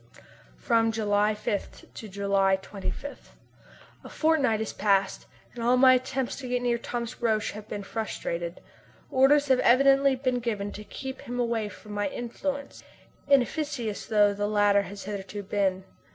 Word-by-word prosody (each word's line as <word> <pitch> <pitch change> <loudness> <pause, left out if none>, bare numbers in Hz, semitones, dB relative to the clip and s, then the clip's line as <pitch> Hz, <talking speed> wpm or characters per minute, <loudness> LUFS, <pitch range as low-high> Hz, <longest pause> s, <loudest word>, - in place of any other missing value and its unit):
From 225 -2 +2
July 210 -1 +1
5 210 -1 -5
to 220 - -9
July 195 0 +2
25. 195 +8 -7 0.7
A - - -10
fortnight 290 -9 +2
has 220 - -3
passed, 195 -2 +1 0.3
and 235 - -6
all 245 +2 +4
my 260 0 +7
attempts 255 0 -1
to 265 - -7
get 245 0 -1
near 240 -1 +1
Thomas 240 +1 -5
Roch 220 -2 +1
have 210 +1 -10
been 205 -1 -5
frustrated. 175 -5 -4 0.5
Orders 280 +2 +4
have 260 -1 +4
evidently 275 +2 +5
been 255 -1 -1
given 210 -4 -3
to 210 - -8
keep 265 +4 -7
him 245 +1 -5
away 230 -3 0
from 210 - -13
my 205 0 -1
influence, 275 +3 -5 0.4
inefficacious 275 -4 0
though 205 -2 +4
the 205 +1 -2
latter 205 -1 +3
has 200 0 -8
hitherto 200 0 -6
been. 190 -1 0
225 Hz, 150 wpm, -27 LUFS, 205-255 Hz, 0.7 s, my